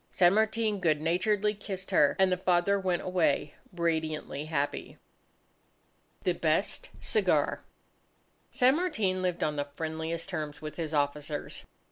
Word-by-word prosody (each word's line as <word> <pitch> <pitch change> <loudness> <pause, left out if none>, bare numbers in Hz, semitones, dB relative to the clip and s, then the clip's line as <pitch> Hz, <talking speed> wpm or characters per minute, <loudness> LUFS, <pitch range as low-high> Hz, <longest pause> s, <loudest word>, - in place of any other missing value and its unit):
San 175 0 +5
Martin 220 -1 +1
good 155 -4 +2
naturedly 195 +6 +1
kissed 195 -2 -7
her, 145 - +4
and 190 -1 +4
the 180 - +2
father 185 +2 +2
went 185 -2 -1
away 165 -5 +1 0.2
radiantly 160 -4 -2
happy. 145 -2 -2 1.3
The - - +2
Best - - 0
Cigar 440 - +1 0.9
San 255 +4 +3
Martin 220 - 0
lived 180 -2 -1
on 150 -1 -1
the 145 0 -1
friendliest 160 +1 -3
terms 155 -5 -4
with 155 0 -7
his 160 -2 -3
officers. 145 +1 -2
175 Hz, 130 wpm, -29 LUFS, 155-195 Hz, 1.3 s, San